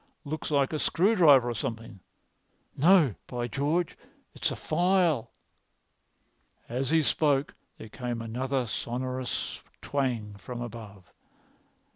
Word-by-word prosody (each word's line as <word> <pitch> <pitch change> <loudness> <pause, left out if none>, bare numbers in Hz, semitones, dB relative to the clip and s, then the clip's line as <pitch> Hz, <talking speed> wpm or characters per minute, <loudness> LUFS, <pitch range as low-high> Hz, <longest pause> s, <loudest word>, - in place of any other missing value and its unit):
Looks 155 +2 -4
like 140 -1 +2
a 155 - -1
screwdriver 165 - +5
or 120 - -1
something. 115 -2 -5 0.8
No, 160 - +5
by 120 -1 -3
George, 150 +7 -1 0.4
it's - - -1
a - - -4
file." 170 -7 +1 1.4
As 130 +2 -2
he 160 0 +4
spoke 140 +1 +1 0.2
there - - -9
came 120 0 -4
another 125 +3 -2
sonorous 125 +2 -3 0.2
twang 120 -7 -2
from 125 +2 -7
above. 110 -6 -9
130 Hz, 110 wpm, -28 LUFS, 120-155 Hz, 1.4 s, screwdriver